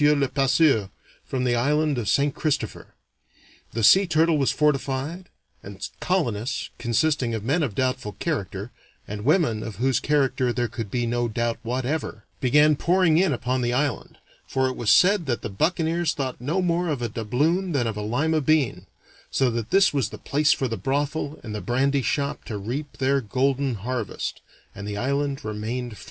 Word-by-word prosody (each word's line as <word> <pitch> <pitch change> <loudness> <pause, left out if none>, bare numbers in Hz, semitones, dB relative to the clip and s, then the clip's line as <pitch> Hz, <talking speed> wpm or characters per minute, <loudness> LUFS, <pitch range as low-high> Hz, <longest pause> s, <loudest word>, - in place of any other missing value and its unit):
le 145 -2 +4
Passeur, 135 -6 +2 0.3
from 130 -1 -3
the 125 -1 +2
island 145 +5 +2
of 105 -4 -2
St. 140 +5 +2
Christopher; 145 -8 -3 0.8
the 115 - -2
Sea 190 - +7
Turtle 160 0 +3
was 135 - +2
fortified, 150 +4 -1 0.3
and 100 0 -7
colonists, 125 - -1
consisting 120 0 +1
of 110 - -4
men 145 +9 +1
of 130 -10 -2
doubtful 130 -5 -1
character 100 - -3 0.4
and 105 0 -6
women 140 - +2
of 110 -2 -6
whose 130 +4 +1
character 135 -4 +1
there 120 0 -1
could 115 -2 -6
be 120 +3 -1
no 120 +1 0
doubt 115 +1 -2
whatever, 125 0 -3
began 150 +4 +4
pouring 170 0 +3
in 185 -3 +3
upon 130 0 -1
the 120 0 0
island, 140 -3 -2 0.3
for 130 0 +1
it 130 - -3
was 115 - -1
said 180 - +5
that 120 -3 -1
the - - -3
buccaneers 165 - 0
thought 130 -4 -4
no 160 +9 0
more 175 0 +1
of 145 -6 -2
a - - 0
doubloon 150 - 0
than 135 -6 +1
of 110 -2 -2
a 105 - -4
Lima 150 +9 0
bean, 150 -3 +1 0.4
so 130 -2 +1
that 115 -1 -3
this 195 -4 +4
was 140 -3 0
the - - -9
place 150 +1 +1
for 130 - +1
the 115 - -3
brothel 145 +7 -2
and 110 -3 -6
the 105 - -4
brandy 135 +7 +1
shop 140 +2 -1
to 110 - -4
reap 130 +8 -5
their 135 +1 +2
golden 130 +3 0
harvest, 115 +1 -4 0.3
and 100 +1 -7
the 105 0 -4
island 140 +3 -1
remained 115 +3 -4
French. - - -14
130 Hz, 180 wpm, -24 LUFS, 115-150 Hz, 0.8 s, Sea